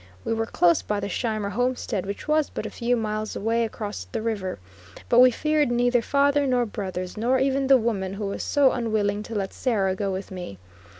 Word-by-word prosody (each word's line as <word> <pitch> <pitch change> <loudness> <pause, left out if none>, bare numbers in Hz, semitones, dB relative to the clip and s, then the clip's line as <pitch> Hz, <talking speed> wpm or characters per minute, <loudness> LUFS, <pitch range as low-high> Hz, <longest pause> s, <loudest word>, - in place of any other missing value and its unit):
We - - 0
were 225 0 -1
close 175 -5 +3
by 210 -1 -2
the 200 - -3
Scheimer 215 -1 -2
homestead, 245 -3 -1
which 200 +7 -6
was 305 -1 +2
but - - -5
a - - -5
few 245 0 0
miles 215 -1 -3
away 230 +3 0
across 205 - -5
the 90 - -5
river; 205 -5 -2 0.5
but 240 - +5
we 255 0 +9
feared 305 +3 +1
neither 245 0 +2
father 280 +3 +2
nor 250 -2 +2
brothers, 185 -3 -5
nor 245 +4 +2
even 270 +1 +1
the 270 0 +7
woman 200 -5 -2
who 205 +1 -4
was 200 - -3
so 285 -2 +3
unwilling 215 -3 0
to 225 +1 -7
let 195 -2 -2
Sarah 200 -7 0
go 195 +1 -2
with 190 +1 -5
me. 180 - -7
225 Hz, 205 wpm, -25 LUFS, 200-250 Hz, 0.5 s, we